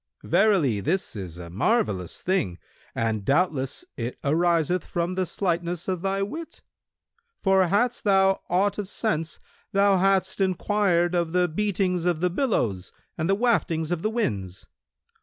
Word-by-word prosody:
Verily, 175 - +3
this 165 - -1
is 90 -5 -6
a 85 -1 -9
marvellous 100 - 0
thing, 105 - 0 0.4
and 110 -2 -1
doubtless 140 - 0
it 120 +1 -4
ariseth 170 +3 +2
from 175 +1 -2
the 185 -1 -1
slightness 175 -2 -2
of 185 -3 -2
thy 195 +1 0
wit; 310 +11 -7 0.8
for 190 -2 +4
hadst 235 +7 +1
thou 195 -1 +3
aught 195 +4 +1
of 205 - -3
sense, 165 -7 -2 0.4
thou 200 0 +4
hadst 190 +1 +1
enquired 185 -2 +1
of 170 -2 0
the 180 0 +3
beatings 180 0 0
of 175 -3 +1
the 180 +1 +1
billows 115 - -1 0.2
and 160 +1 -2
the 195 - +4
waftings 180 -9 +1
of 175 -2 -1
the 215 - 0
winds. 100 - -3
180 Hz, 145 wpm, -25 LUFS, 155-195 Hz, 0.8 s, for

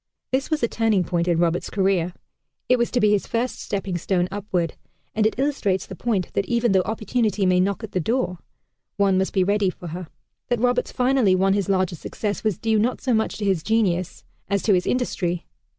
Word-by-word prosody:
This 260 +1 0
was 310 -5 0
a - - +4
turning 225 -5 +1
point 175 -1 -1
in 170 -2 +2
Roberts' 170 0 +1
career. 190 -3 +1 0.5
It 250 -1 +4
was 235 - +1
to 250 - 0
be 210 -3 +4
his 205 -2 +1
first 240 +2 -2
stepping 195 -3 -3
stone 180 0 0
upward, 190 -5 -2 0.4
and 215 0 +3
it 220 - -3
illustrates 260 -9 0
the 190 - -8
point 205 -4 -1
that 200 - 0
even 235 -1 +2
though 190 -1 +4
Opportunity 215 0 0
may 180 0 +4
knock 200 +4 0
at 220 - -6
the 185 - 0
door 200 -2 -1 0.6
one 200 -2 +3
must 190 - 0
be 190 - +2
ready 200 0 +2
for 175 -1 -8
her. 175 +1 -6 0.4
That 245 - 0
Roberts 250 +1 +1
finally 250 -6 +3
won 195 +1 +3
his 200 0 -1
larger 185 -2 +1
success 205 +5 -4
was 215 -5 0
due 225 -1 +1
not 240 +4 0
so 255 - 0
much 220 0 0
to 210 - -3
his 190 -5 +1
genius 185 -4 0 0.3
as 200 -1 0
to 210 - +4
his 180 -1 +1
industry. 180 -9 -1
200 Hz, 215 wpm, -23 LUFS, 185-230 Hz, 0.6 s, a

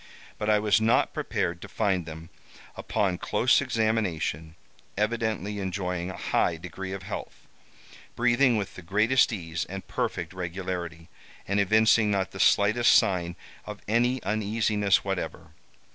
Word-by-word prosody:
But 105 - -1
I 105 - +5
was 105 +1 +2
not 110 +1 +2
prepared 85 0 -2
to - - -8
find 95 -6 -1
them, 80 +1 -9 0.4
upon 95 -4 -1
close 120 +7 +3
examination, 105 - -1 0.4
evidently 105 -2 -1
enjoying 90 -2 -3
a 95 - -7
high - - 0
degree 95 0 -7
of 95 -1 -6
health, - - -7 0.7
breathing 120 0 +3
with 100 -3 -3
the - - -10
greatest 110 +9 +3
ease 85 -5 -3
and 95 +1 -8
perfect 85 0 -3
regularity, 90 -2 -5 0.4
and 100 +1 +1
evincing 110 +2 +4
not 100 -2 0
the - - -9
slightest 110 +4 +4
sign 85 -3 +2 0.3
of - - -7
any 120 +4 +1
uneasiness 105 -1 +1
whatever. 95 -5 -4
100 Hz, 135 wpm, -27 LUFS, 90-110 Hz, 0.7 s, I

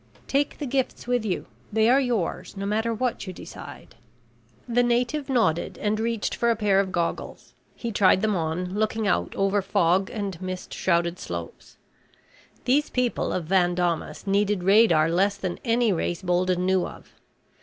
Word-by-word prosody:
"Take 280 +1 0
the 295 - -4
gifts 265 0 -2
with 245 -1 0
you. 200 -4 -2 0.3
They 220 +1 +3
are 255 +3 +5
yours, 235 -7 -2
no 195 - -3
matter 220 +3 0
what 230 -2 -2
you 185 - -5
decide." - - -11 0.7
The 245 0 +2
native 245 +4 0
nodded 220 -11 +1
and 215 +1 -1
reached 230 -1 -1
for 235 - +1
a 230 - +3
pair 205 -3 +2
of 195 -1 0
goggles. 170 -2 -3 0.2
He 235 - -4
tried 195 -2 +4
them 215 -2 +2
on, 175 +2 -2
looking 215 +1 0
out 180 - 0
over 195 +1 +1
fog 185 0 +2
and 195 -5 -5
mist 185 0 -5
shrouded 170 -1 0
slopes. 85 -1 -7 0.9
These 290 +4 +2
people 250 -2 0
of 175 - -2
Van 175 0 +2
Daamas 175 -2 -2
needed 200 -1 +1
radar 195 -5 +5
less 195 +4 +1
than 185 -3 -4
any 230 -3 +2
race 175 +1 -2
Bolden 180 0 +1
knew 185 -1 +2
of. - - -13
200 Hz, 165 wpm, -25 LUFS, 180-230 Hz, 0.9 s, are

